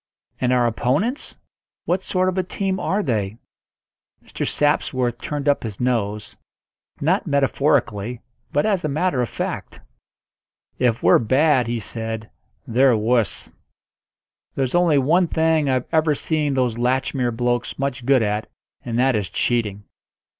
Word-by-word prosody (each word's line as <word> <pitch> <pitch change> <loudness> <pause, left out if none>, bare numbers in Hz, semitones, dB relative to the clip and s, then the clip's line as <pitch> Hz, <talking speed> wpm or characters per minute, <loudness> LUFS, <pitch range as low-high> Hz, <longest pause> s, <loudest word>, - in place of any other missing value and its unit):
"And 125 -1 +1
our 125 -1 +3
opponents 135 - -1 0.5
what 180 +2 0
sort 185 -1 0
of 185 - 0
a 190 - +2
team 190 +1 -2
are 205 +2 0
they?" 105 - -1 0.9
Mr. - - -4
Sapsworth 130 -5 0
turned 145 +3 -4
up 145 - +3
his 110 -4 -6
nose 105 -4 -1 0.6
not 180 +7 +1
metaphorically, 135 -6 +1 0.3
but 145 - +1
as 200 -4 +1
a - - 0
matter 150 -2 0
of 120 - -1
fact. - - -5 1.0
"If 120 -3 +1
we're - - +6
bad," 130 +2 +3
he 120 0 -1
said, 110 0 -5 0.3
"they're 125 -1 +3
wuss. 115 +1 0 1.0
There's 130 -2 -1
only 175 -4 +4
one 165 +7 +3
thing 160 -3 +2
I've 130 -1 +1
ever 155 -2 +3
seen 150 -2 0
those 125 -3 0
Latchmere 125 -1 0
blokes 120 -1 -1
much 135 -2 -3
good 130 -1 +3
at, 105 +1 -2 0.3
and 120 -2 -3
that 130 0 +3
is 105 -4 -2
cheating. 105 -4 -1
130 Hz, 140 wpm, -22 LUFS, 115-150 Hz, 1.0 s, we're